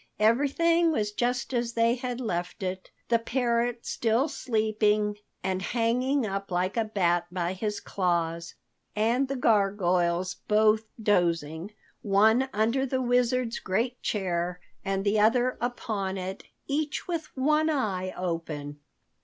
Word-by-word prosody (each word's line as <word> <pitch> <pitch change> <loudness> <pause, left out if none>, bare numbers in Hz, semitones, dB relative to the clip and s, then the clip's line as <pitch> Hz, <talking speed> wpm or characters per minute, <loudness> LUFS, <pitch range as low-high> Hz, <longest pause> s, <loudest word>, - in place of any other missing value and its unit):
Everything 290 +10 +3
was 210 -8 0
just 245 +4 -1
as 235 -1 -1
they 230 0 +3
had 250 0 -4
left 180 -6 -3
it, 185 0 -4 0.2
the 235 -1 +4
parrot 235 0 0
still 230 +3 +1
asleep 220 -7 -2 0.6
and 190 0 -1
hanging 245 +5 +1
up 195 -1 -4
like 180 +1 0
a 230 - +2
bat 175 -5 +1
by 180 0 -1
his 210 +2 -3
claws, 170 -2 -1 0.4
and 235 +5 +2
the 275 - -3
gargoyles 185 -6 +2
both 215 +1 +4 0.2
dozing, 170 -3 +1 0.3
one 220 +6 +3
under 230 +5 +1
the 260 -1 -1
Wizard's 245 -1 +1
great 235 +7 -1
chair 180 -3 -1 0.2
and 195 -1 -1
the 210 +1 +3
other 245 +4 +3
upon 215 -6 -2
it, 190 +1 -5 0.2
each 295 +1 -2
with 335 -3 -3
one 305 +4 +3
eye 195 -11 -1
open. 160 -5 -4
215 Hz, 130 wpm, -27 LUFS, 185-245 Hz, 0.6 s, the